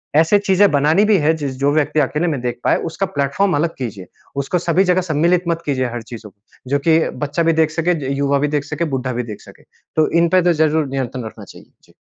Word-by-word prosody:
ऐसे 165 Hz, +6 st, +5 dB
चीज़ें 200 Hz, 0 st, +3 dB
बनानी 150 Hz, +7 st, +3 dB
भी 210 Hz, -, +5 dB
है 155 Hz, -1 st, +2 dB
जिस 140 Hz, -3 st, -4 dB
जो 140 Hz, +1 st, +2 dB
व्यक्ति 155 Hz, 0 st, +1 dB
अकेले 150 Hz, +4 st, 0 dB
में 150 Hz, -5 st, -1 dB
देख 120 Hz, -1 st, -3 dB
पाए -, -, +3 dB
उसका 180 Hz, +4 st, -2 dB
प्लैटफ़ॉर्म 145 Hz, +7 st, +1 dB
अलग 165 Hz, +3 st, -1 dB
कीजिए। 105 Hz, -8 st, -6 dB, 0.4 s
उसको 180 Hz, -, -1 dB
सभी 175 Hz, +2 st, +2 dB
जगह 180 Hz, 0 st, +2 dB
सम्मिलित 170 Hz, +1 st, +1 dB
मत 170 Hz, -1 st, -1 dB
कीजिए 130 Hz, -3 st, 0 dB
हर 120 Hz, 0 st, -5 dB
चीज़ों 110 Hz, -2 st, -8 dB
को। 105 Hz, +5 st, -20 dB
जो 140 Hz, -, +2 dB
कि 160 Hz, 0 st, +5 dB, 0.2 s
बच्चा 150 Hz, +4 st, -1 dB
भी 165 Hz, 0 st, +3 dB
देख 160 Hz, -1 st, +2 dB
सके, 160 Hz, +2 st, 0 dB, 0.2 s
य -, -, 0 dB
युवा 140 Hz, 0 st, +1 dB
भी 145 Hz, -, +1 dB
देख 145 Hz, -1 st, -1 dB
सके, 150 Hz, +3 st, -3 dB
बुड्ढा 130 Hz, -4 st, -3 dB
भी 125 Hz, +1 st, -2 dB
देख -, -, -13 dB
सके। -, -, -17 dB, 0.3 s
तो 155 Hz, -1 st, +3 dB
इनपे 175 Hz, +2 st, +3 dB
तो 175 Hz, 0 st, +3 dB
ज़रूर 155 Hz, 0 st, +1 dB
नियंत्रण 130 Hz, -2 st, -4 dB
रखना 110 Hz, -, -10 dB
चाहिए। -, -, -16 dB
जी। -, -, -24 dB
150 Hz, 240 wpm, -18 LUFS, 135-170 Hz, 0.4 s, ऐसे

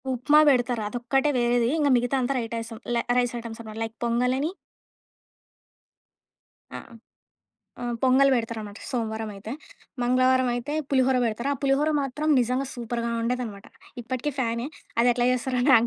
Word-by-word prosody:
ఉప్మా 260 Hz, +5 st, +4 dB
పెడతారు 245 Hz, -3 st, +2 dB
అదొక్కటే 245 Hz, +6 st, 0 dB
వేరేది 240 Hz, -1 st, +2 dB
ఇంక 290 Hz, -2 st, +3 dB
మిగతాదంతా 250 Hz, +2 st, 0 dB
రైటైసం 230 Hz, -1 st, -5 dB, 0.2 s
ల 235 Hz, -, +1 dB
రైస్ 245 Hz, -1 st, +1 dB
ఐటెమ్స్ 230 Hz, -1 st, -8 dB
అనమాట 220 Hz, -1 st, -8 dB
లైక్ 225 Hz, 0 st, -6 dB
పొంగ‌ల్ 240 Hz, +2 st, +1 dB
అని. 305 Hz, +4 st, -1 dB, 2.2 s
అ! -, -, -3 dB
ఆ! -, -, -6 dB, 1.0 s
ఆ! -, -, -6 dB, 0.2 s
పొంగల్ 265 Hz, +1 st, +5 dB
పెడతారనమాట 225 Hz, -3 st, -4 dB
సోమవారం 220 Hz, -3 st, -3 dB
అయితే 200 Hz, +3 st, -7 dB, 0.5 s
మంగళవారం 255 Hz, +1 st, +3 dB
అయితే 245 Hz, +4 st, -4 dB, 0.2 s
పులిహోర 260 Hz, -1 st, +3 dB
పెడతారు. 235 Hz, +4 st, -1 dB
ఆ -, -, -6 dB
పులిహోర 280 Hz, +3 st, +2 dB
మాత్రం 290 Hz, +3 st, -3 dB
నిజంగా 250 Hz, +3 st, 0 dB
సూపర్‌గా 235 Hz, -1 st, -3 dB
ఉండేదనమాట. 230 Hz, -4 st, -3 dB, 0.4 s
ఇప్పటికీ 255 Hz, +5 st, -3 dB
ఫ్యానే 235 Hz, -1 st, -1 dB, 0.3 s
అది 245 Hz, +1 st, +5 dB
ఎట్లా 240 Hz, 0 st, +1 dB
చేస్తారో 255 Hz, 0 st, -1 dB
నాకు 230 Hz, -2 st, +6 dB
245 Hz, 140 wpm, -25 LUFS, 230-260 Hz, 2.2 s, నాకు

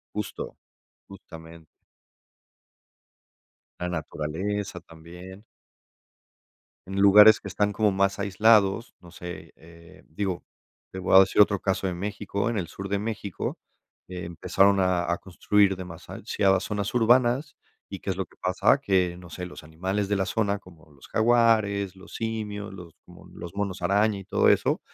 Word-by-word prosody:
Justo. 105 Hz, -2 st, -5 dB, 0.5 s
Justamente. 80 Hz, -4 st, -13 dB, 2.1 s
La 90 Hz, -, -2 dB
naturaleza 90 Hz, +4 st, -4 dB
también. 90 Hz, +5 st, -13 dB, 1.4 s
En 95 Hz, +1 st, -6 dB
lugares 105 Hz, +2 st, +8 dB
que -, -, -8 dB
están 105 Hz, 0 st, 0 dB
como 105 Hz, 0 st, +2 dB
más 100 Hz, +1 st, +1 dB
aislados, 105 Hz, +2 st, +3 dB
no 85 Hz, -, -15 dB
sé, 90 Hz, 0 st, -9 dB
eh, 85 Hz, 0 st, -17 dB
digo, 90 Hz, +2 st, -4 dB, 0.5 s
te 95 Hz, -, -8 dB
voy 95 Hz, 0 st, +3 dB
a -, -, +11 dB
decir 95 Hz, -, +5 dB
otro 100 Hz, -1 st, +1 dB
caso 95 Hz, 0 st, -1 dB
de 90 Hz, -, -2 dB
México, 100 Hz, +3 st, -3 dB
en 115 Hz, -, -2 dB
el 85 Hz, -4 st, -3 dB
sur 100 Hz, 0 st, -7 dB
de 100 Hz, +1 st, 0 dB
México 105 Hz, -3 st, -4 dB, 0.5 s
empezaron 90 Hz, +3 st, +1 dB
a 90 Hz, -2 st, +1 dB
a 85 Hz, -, -1 dB
construir 95 Hz, +1 st, +1 dB
demasiado 95 Hz, +2 st, -1 dB
zonas 100 Hz, +2 st, -3 dB
urbanas, 125 Hz, +5 st, +2 dB, 0.3 s
¿y 100 Hz, -, -6 dB
qué -, -, -10 dB
es 95 Hz, -, -2 dB
lo 95 Hz, -, -2 dB
que -, -, -25 dB
pasa?, 90 Hz, +8 st, +2 dB
que, 95 Hz, -9 st, +1 dB
no 90 Hz, -1 st, -12 dB
sé, 90 Hz, +2 st, -7 dB
los 90 Hz, -, -10 dB
animales 95 Hz, +6 st, -3 dB
de 105 Hz, -, +1 dB
la 95 Hz, -, 0 dB
zona 105 Hz, -2 st, 0 dB
como 85 Hz, -5 st, -19 dB
los 70 Hz, -1 st, -17 dB
jaguares, 110 Hz, -4 st, +2 dB
los 95 Hz, +1 st, -14 dB
simios, 105 Hz, -3 st, -4 dB
los 90 Hz, -4 st, -11 dB
como -, -, -16 dB
los 85 Hz, +1 st, -9 dB
monos 100 Hz, -2 st, -3 dB
araña 100 Hz, +3 st, +2 dB
y 95 Hz, -, -9 dB
todo 95 Hz, -, +2 dB
eso, -, -, +2 dB
95 Hz, 150 wpm, -26 LUFS, 90-105 Hz, 2.1 s, a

